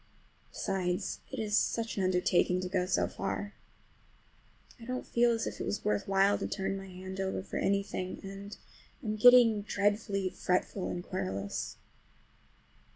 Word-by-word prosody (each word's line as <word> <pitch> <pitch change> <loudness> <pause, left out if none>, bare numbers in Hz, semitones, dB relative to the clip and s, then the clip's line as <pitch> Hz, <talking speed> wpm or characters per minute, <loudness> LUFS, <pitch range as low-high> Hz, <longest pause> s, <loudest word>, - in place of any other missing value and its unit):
Besides, 185 +1 -2
it 265 - -5
is 215 -2 0
such 230 +1 +1
an 195 - -1
undertaking 180 0 +2
to 185 - -3
go 180 -1 0
so - - +2
far. 205 +1 -4 1.3
I 230 - -10
don't 255 +1 -3
feel 240 0 +3
as 230 -1 0
if - - -5
it - - -1
was 205 - -3
worth 210 -1 0
while 195 +1 +3
to - - -2
turn 195 0 -2
my 195 0 -7
hand 190 +1 -8
over 190 -1 -2
for - - -5
anything, 195 -2 -1
and 195 +1 -8 0.5
I'm 215 -2 -1
getting 230 -1 +7
dreadfully 200 -1 0
fretful 185 +1 -1
and 175 - -4
querulous. 100 - -3
195 Hz, 155 wpm, -31 LUFS, 185-210 Hz, 1.3 s, getting